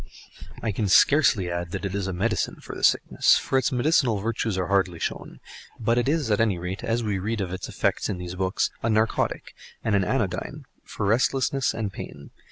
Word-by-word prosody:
I 110 - 0
can 105 +1 -1
scarcely 100 - +4
add 85 0 -3
that 90 - -4
it 95 - -3
is 100 -1 -2
a - - -2
medicine 105 +4 -1
for - - -9
the - - -8
sickness, - - +4
for 130 - +1
its 130 - 0
medicinal 125 -3 +2
virtues 110 -1 -2
are 90 - 0
hardly 95 -2 +1
shown; - - -5 0.4
but 115 +2 +2
it 120 - 0
is, 150 -7 0
at 105 - +3
any 105 -5 +2
rate, 90 +3 -5
as 115 +1 0
we 105 -3 -1
read 110 +4 -2
of 95 -2 -3
its 95 - -5
effects - - -1
in 95 - -2
these 90 0 -6
books, 95 +1 0
a 115 - 0
narcotic 110 0 0 0.3
and 110 - 0
an 100 -1 +3
anodyne - - -2 0.2
for - - -5
restlessness 125 +3 +1
and 105 -3 -3
pain. 70 0 -9
105 Hz, 205 wpm, -25 LUFS, 95-115 Hz, 0.4 s, scarcely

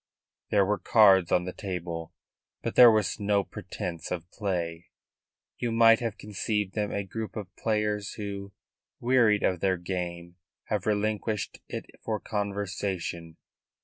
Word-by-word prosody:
There 100 -2 +4
were 105 +1 0
cards 95 -6 +5
on 90 - +3
the 90 - -4
table; 85 -4 -5 0.5
but - - -2
there 125 -1 +10
was 110 -4 +1
no 100 -1 +2
pretence 85 -3 -6
of 85 -2 -4
play. 85 -5 -3 0.7
You 120 -1 -1
might 115 0 +6
have 115 -4 -3
conceived 105 -1 -2
them 105 -1 -1
a 100 - -1
group 110 +3 -6
of 100 -4 -7
players 105 -2 -1
who, 100 -1 -6 0.5
wearied 120 -4 +3
of 90 -2 +1
their 95 0 +1
game, 85 -1 -5 0.3
had 105 -2 -1
relinquished 105 -1 -1
it - - -5 0.2
for 110 -1 -2
conversation. 95 -5 -3
100 Hz, 140 wpm, -28 LUFS, 90-105 Hz, 0.7 s, there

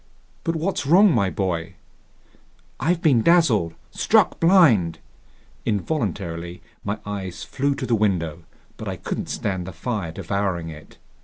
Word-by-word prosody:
"But 165 - -1
what's 160 -3 -2
wrong, 190 +6 +6
my 100 -6 +2
boy?" 90 -4 -2 1.0
"I've 165 +5 0
been 135 -8 +5
dazzled, 115 - +3 0.2
struck - - +2
blind!" 150 - +5 0.7
Involuntarily 90 - -3 0.2
my 100 +1 -2
eyes 95 -3 -5
flew 140 +1 -1
to 135 - -4
the 120 - 0
window, 90 -7 0 0.4
but - - -7
I - - -2
couldn't - - -5
stand 95 -3 -2
the - - -5
fire 100 -3 -3
devouring 95 -1 -2
it. 75 -1 -12
100 Hz, 135 wpm, -23 LUFS, 85-140 Hz, 1.0 s, wrong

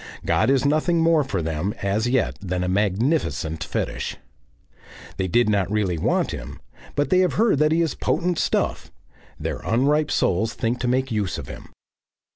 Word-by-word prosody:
God - - +2
is 135 0 +3
nothing 155 +4 +2
more 165 -2 +4
for 100 -10 -3
them 80 +5 -2
as 105 +4 0
yet 125 -2 +1
than 90 -2 -2
a - - -1
magnificent 95 - 0
Fetish. - - -3 1.0
They 95 -1 -1
did 120 +7 +3
not 100 -3 +1
really 100 -6 0
want - - +1
him, 65 +4 -7 0.4
but 145 +4 0
they 185 - +5
have 185 -1 +2
heard 220 -9 +2
that 150 0 +3
he 165 +1 +3
is 160 - -1
potent 175 -1 -1
stuff; - - -1 0.5
their - - -3
unripe 145 +6 +1
souls 110 +6 +1
think 120 +1 -1
to 125 - -1
make 130 +1 0
use 105 -4 -1
of - - -7
him. - - -9
115 Hz, 175 wpm, -23 LUFS, 95-150 Hz, 1.0 s, they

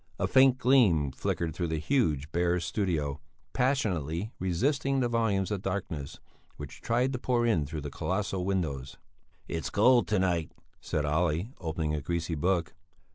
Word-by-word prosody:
A 95 - 0
faint 130 +4 +5
gleam 115 - +4
flickered 80 +4 -2
through 85 +2 -2
the 80 0 -1
huge, 80 - 0
bare 90 +1 +1
studio, 80 -5 -2 0.3
passionately 105 - 0
resisting 135 - 0
the 125 - +2
volumes 110 -5 0
of 100 -3 -2
darkness 90 -8 -4 0.4
which 75 -2 -9
tried 125 +3 +1
to 125 - -3
pour 120 -1 +1
in 85 -11 +1
through 75 +1 -5
the 70 0 -6
colossal 95 +3 -2
windows. 80 -9 -2 0.5
"It's 80 -1 -3
cold 120 +4 +4
to 105 - +1
night," 90 -4 0 0.3
said 75 - -2
Olle, 80 +5 0
opening 80 -2 -2
a 75 - -2
greasy 85 +2 -2
book. 85 +1 0
90 Hz, 155 wpm, -29 LUFS, 80-115 Hz, 0.5 s, faint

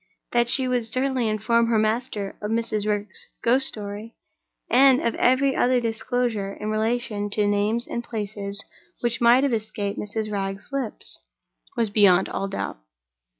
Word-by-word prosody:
That 240 0 +2
she 260 +1 +3
would 245 -3 0
certainly 255 0 0
inform 230 +2 +2
her 230 -1 +2
master 215 -2 -1
of 210 - -3
Mrs. 225 -2 -1
Wragge's 205 -1 -3 0.2
ghost 255 +3 +5
story, 210 +2 -6 0.5
and 265 +1 +5
of 235 - 0
every 265 +2 +2
other 250 0 +3
disclosure 230 -3 -2
in 215 +1 -4
relation 215 -1 -1
to 210 0 +1
names 210 +4 0
and 235 - -4
places 205 -3 -5 0.4
which 240 0 -1
might 240 +3 +6
have 275 -3 +1
escaped 215 -2 -3
Mrs. 215 +1 -4
Wragge's 195 +3 -4
lips, 270 -5 -5 0.6
was 225 -3 +1
beyond 190 -3 +5
all 195 - -3
doubt. 195 - -4
220 Hz, 150 wpm, -24 LUFS, 205-240 Hz, 0.6 s, might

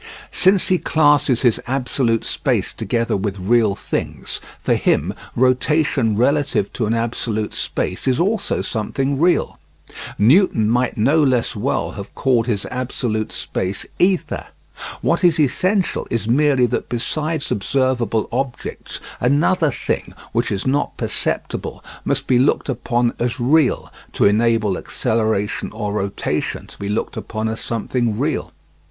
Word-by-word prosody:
Since 190 0 +3
he 185 -1 +3
classes 145 -4 +3
his 120 -4 +3
absolute 125 -3 0
space - - -1
together 115 -1 -1
with 100 0 -2
real 105 +1 +2
things, - - -4 0.2
for - - +1
him - - +1 0.2
rotation 130 -2 +2
relative 135 -3 +1
to 115 - -1
an 115 - +1
absolute 115 -2 -2
space 90 - -3
is 130 -1 +2
also 200 +4 0
something 135 +5 -2
real. 175 +2 +2 0.6
Newton 115 - +4
might 120 +2 +1
no 140 +9 +3
less 130 -4 +1
well - - -1
have - - -9
called 120 -3 +2
his 105 -4 0
absolute 125 -4 -2
space 95 +1 -3
"Ether"; 185 0 +1 0.5
what - - +1
is 170 -3 +4
essential 185 +7 +1
is 115 -2 -2
merely 135 +1 +4
that 120 - -2
besides 155 +6 -2
observable 125 0 0
objects, 130 0 -4 0.2
another 150 +5 +3
thing, 135 - -3 0.2
which - - 0
is 100 - -2
not 140 +2 0
perceptible, - - -3 0.2
must - - -1
be 125 -2 +3
looked 135 +2 +2
upon 120 -1 0
as 120 +1 -1
real, 140 +3 +2 0.2
to - - +2
enable 110 -1 +2
acceleration 110 -2 -1
or 105 -2 -3
rotation 100 -1 -2
to - - -16
be 100 - -4
looked 105 - -2
upon 110 0 -3
as 110 0 -3
something 115 -1 -1
real. - - -1
125 Hz, 135 wpm, -20 LUFS, 110-145 Hz, 0.6 s, Newton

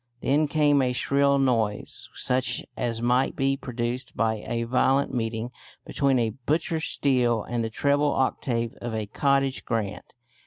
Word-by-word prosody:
Then 150 +3 +2
came 145 -1 +3
a 125 -1 +1
shrill 140 +2 +2
noise 115 -6 -1
such 125 0 0
as 115 -1 -2
might 125 +2 +2
be 135 0 +1
produced 125 -1 -4
by 110 -2 0
a 115 0 -1
violent 135 +3 +2
meeting 115 0 -2 0.3
between 140 -2 +1
a 115 -2 +1
butcher's 155 +6 -1
steel 120 -5 +2
and 120 -1 -2
the 115 - -2
treble 145 +5 +1
octave 120 -3 -1
of 120 -2 -4
a 110 -1 -2
"cottage 135 +4 +1
grand." 110 -2 -4
125 Hz, 150 wpm, -26 LUFS, 115-140 Hz, 0.3 s, came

